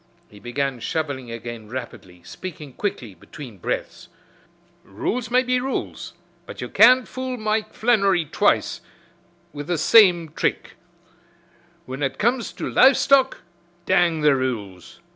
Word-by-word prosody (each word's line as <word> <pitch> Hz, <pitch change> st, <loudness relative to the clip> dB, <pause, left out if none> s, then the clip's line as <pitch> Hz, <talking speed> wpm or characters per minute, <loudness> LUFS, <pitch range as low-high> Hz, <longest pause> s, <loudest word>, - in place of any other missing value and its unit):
He 105 Hz, -, -15 dB
began 130 Hz, +2 st, -3 dB
shoveling 140 Hz, -3 st, -3 dB
again 115 Hz, -1 st, -8 dB
rapidly, 100 Hz, -8 st, -9 dB
speaking 150 Hz, -, -9 dB
quickly 125 Hz, -, -4 dB
between 115 Hz, -, -12 dB
breaths. -, -, -5 dB, 0.7 s
"Rules 225 Hz, -, -4 dB
may 250 Hz, +1 st, +3 dB
be 250 Hz, 0 st, +1 dB
rules, 265 Hz, +1 st, -5 dB, 0.3 s
but -, -, -10 dB
you -, -, -5 dB
can't 250 Hz, +2 st, +6 dB
fool 260 Hz, -1 st, -5 dB
Mike 215 Hz, -1 st, -1 dB
Flannery 200 Hz, -7 st, +2 dB
twice -, -, +1 dB, 0.7 s
wid 145 Hz, 0 st, -7 dB
the 175 Hz, -1 st, 0 dB
same 180 Hz, -5 st, +5 dB
thrick 155 Hz, -, -2 dB, 1.1 s
whin 130 Hz, +2 st, -7 dB
ut 135 Hz, -1 st, -2 dB
comes 235 Hz, +2 st, 0 dB
to -, -, -5 dB
live 260 Hz, +1 st, +5 dB
stock, 270 Hz, -1 st, +3 dB, 0.4 s
dang 175 Hz, -4 st, +2 dB
the 150 Hz, -2 st, +4 dB
rules. 105 Hz, -9 st, -5 dB
155 Hz, 130 wpm, -22 LUFS, -, 1.1 s, can't